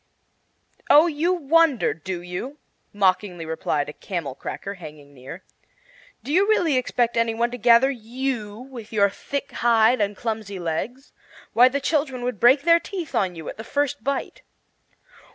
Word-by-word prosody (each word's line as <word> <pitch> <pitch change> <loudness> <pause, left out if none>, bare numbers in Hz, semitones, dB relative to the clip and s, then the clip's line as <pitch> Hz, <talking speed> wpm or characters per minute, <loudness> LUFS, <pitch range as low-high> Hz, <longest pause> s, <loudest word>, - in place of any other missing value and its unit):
"Oh, 300 +3 +8
you 330 +1 0
wonder, 330 -5 +2
do 175 +2 -6
you?" 180 +11 -6 0.3
mockingly 185 -3 0
replied 155 -2 -2
a 150 - -7
camel 165 -8 -5
cracker 195 +8 -6
hanging 150 -5 -12
near, 135 +7 -11 0.8
"do 285 - -4
you 390 +4 +4
really 345 -9 +3
expect 245 -2 0
any 230 -1 +1
one 235 +1 0
to 245 - -5
gather 235 +4 +5
you, 235 -3 -4
with 245 -3 -10
your 200 -2 +3
thick 280 +5 -5
hide 235 0 +3
and 205 -1 -1
clumsy 220 -4 -4
legs? 185 - -4 0.4
Why, 245 +2 +6
the 280 +2 -2
children 280 -3 -1
would 245 -5 -3
break 260 +4 +5
their 335 0 +5
teeth 350 -4 -7
on 185 -2 0
you 160 -2 -9
at - - -7
the 220 - -7
first 285 -2 -2
bite." 275 +1 -3
235 Hz, 160 wpm, -23 LUFS, 195-275 Hz, 0.8 s, Oh